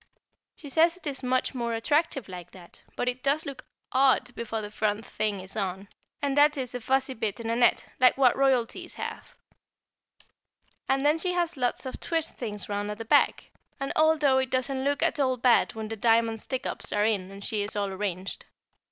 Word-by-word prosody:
She 295 - -11
says 330 +5 +3
it 365 - -18
is 280 -3 -3
much 255 +1 0
more 235 -2 -2
attractive 285 - 0
like 180 -2 -8
that, 175 -2 -15
but 245 - -2
it 250 +1 -1
does 280 +4 +1
look 275 -2 -7 0.3
odd 260 -2 +3
before 225 -1 -4
the 210 -1 -6
front 215 0 -1
thing 210 -2 -2
is 190 +2 -6
on, 195 -1 -3 0.3
and 280 -1 +1
that 295 +1 +5
is 255 -2 -4
a 250 - -3
fuzzy 265 +3 +1
bit 220 -3 -3
in 230 0 -3
a - - +1
net, 240 0 +3
like 255 0 +5
what 260 -3 +5
Royalties 270 +6 0
have. - - -7 1.5
And 270 +1 +2
then 300 +2 +4
she 360 +2 -1
has 345 -1 0
lots 250 0 -1
of 260 - -6
twist 325 -1 -2
things 210 -4 -5
round 205 0 -2
at 210 - -4
the 225 - -6
back, - - +3 0.3
and 275 - -3
although 305 -4 +4
it 260 -1 -1
doesn't 260 +1 -1
look 285 +2 +1
at 330 -2 +1
all 260 -2 +2
bad 240 -2 +3
when 220 -1 -4
the 225 - -4
diamond 225 0 +2
stick 260 -1 -3
ups - - -5
are 205 0 +2
in 200 -4 0
and 195 0 -9
she 215 -2 0
is 205 +1 -3
all 200 -1 0
arranged. 190 -1 -4
250 Hz, 205 wpm, -27 LUFS, 215-275 Hz, 1.5 s, that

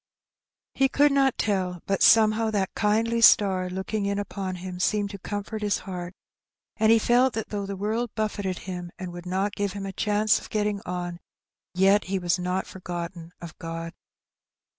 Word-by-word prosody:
He 270 0 +2
could 290 +1 +4
not 270 -2 +2
tell, 185 -4 -1
but 195 -1 -1
somehow 220 0 +5
that 200 -3 -1
kindly 225 +2 +1
star 190 -4 +5
looking 195 +3 -3
in 200 0 -1
upon 195 -2 -4
him 180 0 -7
seemed 205 +1 +1
to 200 - -8
comfort 205 +3 -5
his 205 -1 +1
heart; 180 -1 -7 0.6
and 220 0 +4
he 230 - +7
felt 245 +3 +3
that 225 - -4
though 200 -2 -3
the 200 - -4
world 220 +4 -1
buffeted 205 -4 -2
him, 180 -2 -6
and 180 -2 -6
would 175 0 -8
not 195 +3 -1
give 200 -2 -2
him 200 -1 -5
a 195 - -5
chance 210 +1 +2
of - - -12
getting 210 -1 -1
on, 175 -1 -4 0.6
yet 195 +2 +4
he 195 +1 -1
was 180 0 0
not 180 +1 -1
forgotten 175 -2 -7
of 170 -2 -9
God. 165 0 -6
200 Hz, 180 wpm, -26 LUFS, 180-215 Hz, 0.6 s, he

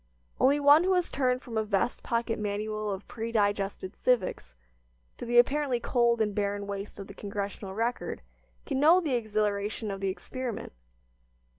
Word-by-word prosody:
Only 280 +2 +4
one 290 +3 +7
who 375 +1 +3
has 360 -1 0
turned 255 -1 0
from 225 -2 -3
a - - +1
vest 205 +2 0
pocket 230 -1 -1
manual 215 +1 -2
of 195 +1 -6
predigested 205 -4 -1
"civics" 245 -7 0 0.6
to - - -5
the 240 0 +2
apparently 265 0 +3
cold 235 -1 +2
and 210 -1 +1
barren 200 0 -1
waste 200 0 -6
of 195 - -6
the 200 - -11
"Congressional 200 -1 -5
Record" 230 +3 -2 0.4
can 270 -2 -1
know 320 +5 +7
the 310 -7 -1
exhilaration 215 -2 -1
of 195 - -5
the 195 - 0
experiment. 245 - -5
220 Hz, 160 wpm, -29 LUFS, 200-250 Hz, 0.6 s, one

